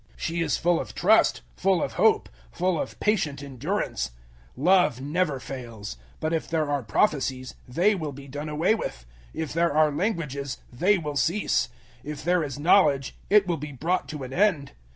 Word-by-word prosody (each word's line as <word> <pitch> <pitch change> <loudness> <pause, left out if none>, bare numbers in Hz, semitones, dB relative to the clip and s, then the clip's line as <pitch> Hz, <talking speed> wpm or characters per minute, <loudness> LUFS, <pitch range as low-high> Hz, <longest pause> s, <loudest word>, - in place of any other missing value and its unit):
She 170 0 -2
is 160 -3 +1
full 175 0 +2
of - - -6
trust, 215 +5 +4
full 190 -1 +2
of - - -3
hope, - - +3 0.2
full 180 -3 0
of - - -7
patient 155 -10 0
endurance. 140 - -2 0.5
013:008 135 - -7
Love 180 -9 +4
never 145 +1 -1
fails. 115 - -7 0.2
But 155 +1 -1
if 165 - -1
there 160 -2 0
are 145 -1 +1
prophecies, 130 - 0
they 175 +12 +3
will 160 -7 -3
be 140 0 -11
done 145 +3 -5
away 160 +7 +2
with; - - -4 0.3
if 160 -3 -3
there 170 +1 +2
are 155 -1 +5
languages, 145 - -2 0.2
they 185 +11 +3
will 150 -4 -4
cease; 170 - +1 0.3
if 150 0 -6
there 175 +1 +2
is 140 -3 -5
knowledge, 145 -4 +3
it 205 -1 +6
will 175 -2 -1
be 150 0 -7
brought 165 +5 -1
to 150 -3 -5
an 130 0 -7
end. 180 -7 +2
155 Hz, 180 wpm, -26 LUFS, 140-180 Hz, 0.5 s, it